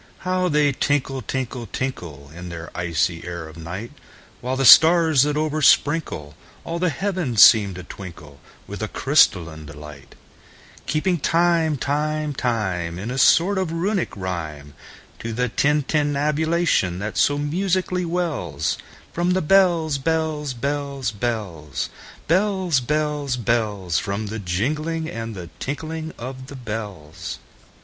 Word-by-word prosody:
How 185 0 +1
they 150 -2 +3
tinkle, 135 -1 0
tinkle, 125 -1 -4
tinkle, 85 - -5
In 90 +1 -8
the 85 -1 -8
icy 85 -1 -1
air 85 -2 -6
of 80 - -12
night! 90 +7 -7 0.5
While 125 +1 -2
the 135 0 0
stars, 160 0 +8
that 145 +1 +2
oversprinkleAll 150 - +2 0.5
the 180 0 +2
heavens, 175 - +2
seem 100 -5 +6
to 90 - -7
twinkleWith 85 +2 -11
a 110 - -1
crystalline 85 - +2
delight; 75 +1 -11 0.7
Keeping 170 +4 0
time, 165 -1 +2
time, 150 +2 -1
time, 95 -10 -2
In 105 +6 -5
a 135 - -2
sort 190 +9 +5
of 185 -4 -1
Runic 185 - -1
rhyme, 80 -6 -5 0.5
To 115 0 -5
the 125 +2 0
tintinnabulation 150 - +1
that 105 +3 -4
so 145 - +3
musically 180 +4 0
wellsFrom 170 - -2
the 185 - +1
bells, 165 -4 +3
bells, 155 -2 -1
bells, 140 0 -2
bells, 100 - -3 0.4
Bells, 185 -3 +2
bells, 150 0 -1
bells—From 105 -3 -1
the 110 - -4
jingling 150 - -2
and 115 -6 -5
the 85 -4 -8
tinkling 160 +3 -4
of 130 +2 -7
the 140 - -9
bells. 105 - -6
135 Hz, 125 wpm, -22 LUFS, 95-160 Hz, 0.7 s, stars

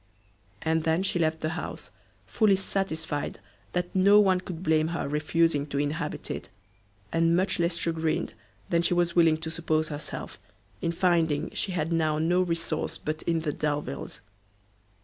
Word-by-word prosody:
And 160 0 +1
then 165 +3 +2
she 185 -2 0
left 160 -1 +1
the 155 - 0
house; 170 +2 -5 0.3
fully 210 -3 +3
satisfied 160 -6 -2 0.3
that 180 0 -2
no 200 +2 +6
one 190 -3 +4
could 180 -2 -7
blame 155 -2 +3
her 170 -2 -2
refusing 150 0 +1
to 145 - -4
inhabit 145 +2 -2
it, - - -6 0.6
and 165 0 +3
much 185 +1 +1
less 170 0 +1
chagrined 165 0 -1 0.4
than 170 -1 +3
she 175 +1 +2
was 175 -1 +1
willing 165 -2 +5
to 160 0 -5
suppose 160 -2 0
herself, 145 -1 -6 0.4
in 170 - 0
finding 165 -3 +1
she 190 - -2
had 165 -1 -1
now 155 -2 +1
no 175 +4 +2
resource 165 -3 -1
but 155 +1 -4
in 165 -1 +2
the 150 -2 -2
Delviles. 145 - -3
165 Hz, 160 wpm, -27 LUFS, 155-175 Hz, 0.6 s, no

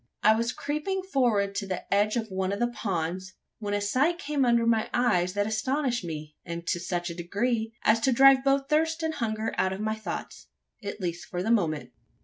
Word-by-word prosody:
I 215 - +7
was 230 +2 0
creeping 305 +9 -2
forward 235 - +1
to 200 0 -3
the 185 -2 -3
edge 210 +2 +3
of 225 -3 -2
one 190 0 -1
of 200 - -1
the 240 - +1
ponds, 185 -3 -3 0.3
when 205 -2 -2
a - - +1
sight 260 +12 +1
came 295 -4 -1
under 235 -1 +3
my 225 -1 +2
eyes 185 -7 +2
that 205 0 +1
astonished 245 +2 0
me; 155 -3 -6
and 170 0 -6
to 175 - 0
such 175 0 -2
a - - -7
degree, 220 +6 -1
as 220 +1 +4
to 260 +4 +2
drive 270 +1 +7
both 275 0 +2
thirst 320 +2 +1
and 320 0 0
hunger 220 -4 -2
out 190 - +2
of 190 - -6
my 215 0 -1
thoughts 220 0 -6 0.4
at 200 +1 -5
least 175 -1 -3
for 180 -1 -3
the 225 - 0
moment. 165 -9 +1
220 Hz, 210 wpm, -27 LUFS, 190-255 Hz, 0.4 s, I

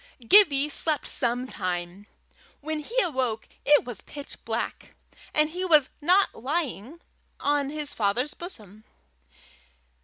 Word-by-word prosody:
Gibbie 300 - +6
slept 300 0 0
some 245 0 +1
time. 185 -2 -5 0.5
When 310 +1 -3
he 470 +11 0
woke, 255 -8 -2 0.2
it 295 0 +5
was 240 -5 -7
pitch 285 -1 -10
dark, - - -4 0.4
and 305 0 +2
he 360 +3 -4
was 310 -7 +5
not 365 +6 +3
lying 280 - -4 0.4
on 285 -1 0
his 300 -1 -4
father's 235 +7 0
bosom. 215 - -8
285 Hz, 120 wpm, -26 LUFS, 235-315 Hz, 0.5 s, Gibbie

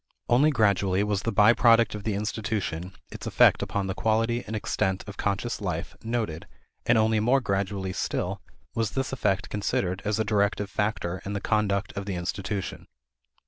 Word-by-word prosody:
Only 130 +6 +5
gradually 100 -6 +2
was 105 -2 0
the 115 - -1
by 105 +1 +6
product 115 -2 +5
of 105 -1 -7
the 110 -3 0
institution, 105 -4 -3 0.2
its - - -7
effect - - +5
upon 100 -1 -2
the 95 - -2
quality 115 +3 +1
and 110 - -4
extent 95 -2 -1
of 100 - -8
conscious 105 +3 -2
life, 90 -3 -3
noted, 110 -9 -3 0.4
and 120 - +5
only 110 0 +3
more 125 +6 +3
gradually 100 -4 -2
still - - -2 0.3
was 115 -3 -1
this 135 0 -2
effect 100 -6 0
considered 95 -2 -1
as 105 +1 0
a 110 - +2
directive 100 -1 +1
factor 105 -4 -1
in 100 - -4
the 100 - -1
conduct 105 -2 0
of 100 0 -5
the 100 - -2
institution. 95 +2 -4
105 Hz, 175 wpm, -27 LUFS, 95-110 Hz, 0.4 s, by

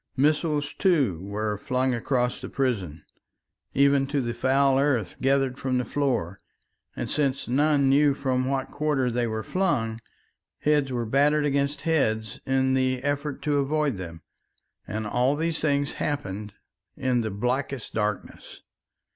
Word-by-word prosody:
Missiles, 150 +1 +1
too, 140 - +2
were 105 +1 -3
flung 130 +3 0
across 125 +1 0
the - - -6
prison, 95 - -2 0.7
even 140 0 +4
to 140 +1 0
the 120 -2 -2
foul 135 +2 +3
earth 130 - +1
gathered 135 -1 +1
from 130 -1 0
the 125 - 0
floor, 120 - -1 0.6
and - - -3
since 140 -3 -1
none 140 +2 +3
knew 140 +1 +4
from 130 -2 0
what 135 0 -2
quarter 145 -5 0
they 120 0 0
were 110 0 -3
flung, 120 -12 -1 0.6
heads 145 -3 +1
were 120 -2 -1
battered 145 +5 +3
against 140 0 0
heads 110 -10 0
in 130 0 +2
the 130 -1 +1
effort 145 0 -2
to 145 -2 +1
avoid 140 -5 0
them. 85 -2 -8 0.6
And 110 +1 -3
all 125 +6 +1
these 165 +1 -1
things 145 -2 0
happened 105 -8 -4 0.4
in 125 -2 +1
the 110 - -2
blackest 125 +5 -2
darkness. 105 -2 -4
130 Hz, 145 wpm, -26 LUFS, 115-145 Hz, 0.7 s, even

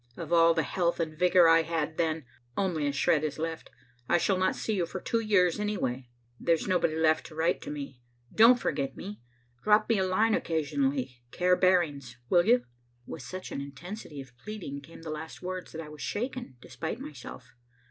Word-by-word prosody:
Of - - -4
all 165 0 +6
the 160 - +2
health 170 +3 0
and 160 -2 -2
vigor 180 +1 +5
I 165 0 +6
had 160 -1 -2
then, 160 -3 0 0.3
only 170 -7 0
a - - +1
shred 145 +2 +2
is 155 - -2
left. 160 0 -4 0.4
I 175 - +5
shall 190 +3 +2
not 185 - +2
see 220 - -2
you 180 -4 0
for 185 - -5
two 230 - 0
years 200 -5 +3
anyway. 130 -12 -2 0.3
There's 165 -2 +1
nobody 175 -4 +2
left 160 -1 +2
to 155 - -13
write 165 +3 +1
to - - -7
me. 140 -4 -7 0.3
Don't 230 +3 +7
forget 140 -9 -2
me. 205 +2 -8 0.4
Drop 210 0 +4
me 225 -3 +2
a - - +2
line 215 +5 +2
occasionally, 140 -7 -1
care 180 +6 +2
Barings, 150 -10 +1
will 175 -1 +5
you?" 245 +2 +4 0.4
With - - -7
such 185 +9 -7
an 140 - -3
intensity 150 +3 -8
of 130 -3 -14
pleading 185 -10 -6
came 165 +3 -13
the 160 - -5
last 155 +3 -7
words 185 0 -5
that 165 - -6
I 155 - -9
was 150 -1 -11
shaken 245 - -4
despite 160 +4 -5
myself. 125 -4 -10
165 Hz, 195 wpm, -29 LUFS, 145-185 Hz, 0.4 s, Don't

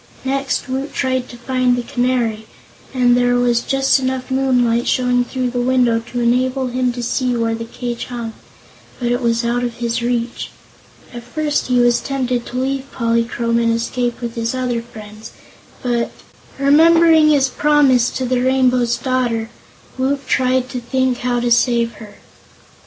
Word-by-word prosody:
Next, 275 +1 -1
Woot 265 +2 -4
tried 260 -1 -1
to 240 - -10
find 255 0 +1
the 245 - -3
Canary, 240 -3 -1 0.4
and 245 -2 +3
there 245 0 +2
was 240 -1 +2
just 270 0 +2
enough 260 0 -3
moonlight 250 -3 +1
showing 250 -1 +2
through 250 0 -3
the 245 0 -1
window 245 -2 +2
to 235 +2 -6
enable 255 +2 +1
him 250 0 0
to 245 0 -5
see 250 +1 0
where 230 -1 0
the 230 0 -5
cage 240 0 -5
hung; 235 -2 -6 0.7
but 240 -1 -1
it 245 +1 0
was 235 0 0
out 240 +1 0
of 240 -1 -3
his 235 0 -2
reach. 240 0 -2 0.6
At 240 - -7
first 295 +5 -2
he 250 -1 +1
was 240 0 +3
tempted 255 -3 -2
to 250 - -6
leave 270 +1 -2
Polychrome 230 0 0
and 230 0 +2
escape 240 +1 -2
with 235 -1 -4
his 230 +1 -2
other 250 -2 -1
friends, 215 -2 -12 0.5
but 240 -2 0 0.5
remembering 320 +2 +5
his 275 -3 +3
promise 275 -5 +3
to 260 - -3
the 250 0 0
Rainbow's 250 -2 +2
Daughter 240 -3 -1 0.5
Woot 275 +2 -1
tried 255 -1 +1
to 250 - -4
think 260 +1 -1
how 245 -1 0
to 240 0 -1
save 235 -1 +2
her. 210 -2 -12
245 Hz, 165 wpm, -18 LUFS, 235-260 Hz, 0.7 s, remembering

